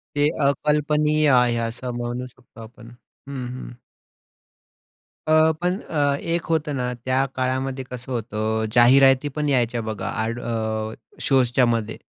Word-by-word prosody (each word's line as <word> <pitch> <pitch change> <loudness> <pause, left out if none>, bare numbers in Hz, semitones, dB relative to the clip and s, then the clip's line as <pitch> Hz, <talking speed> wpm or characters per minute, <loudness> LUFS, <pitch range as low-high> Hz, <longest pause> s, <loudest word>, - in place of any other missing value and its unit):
ते 145 +1 +3 0.2
अकल्पनीय 150 +2 +2
आहे, 125 -2 +4
असं 125 +2 -5
म्हणू 120 +1 -4
शकतो 125 -2 -17
आपण. 115 +1 -13 0.4
हं, 135 -3 -5
हं. 125 0 -8 1.5
अ, 155 0 +5
पण 180 +2 0
अ, 145 -3 0
एक 165 0 -2
होतं 155 -2 0
ना 125 -1 -2
त्या 130 +1 +2
काळामध्ये 130 +1 -2
कसं 125 +1 -7
होतं 110 -1 -2
जाहिराती 135 +3 +6
पण 150 -1 -1
यायच्या 120 -3 +1
बघा 110 -1 -4
एड 115 +2 -3
अ, 110 -1 -3 0.3
शोजच्यामध्ये. 120 -4 +2
130 Hz, 130 wpm, -23 LUFS, 120-145 Hz, 1.5 s, जाहिराती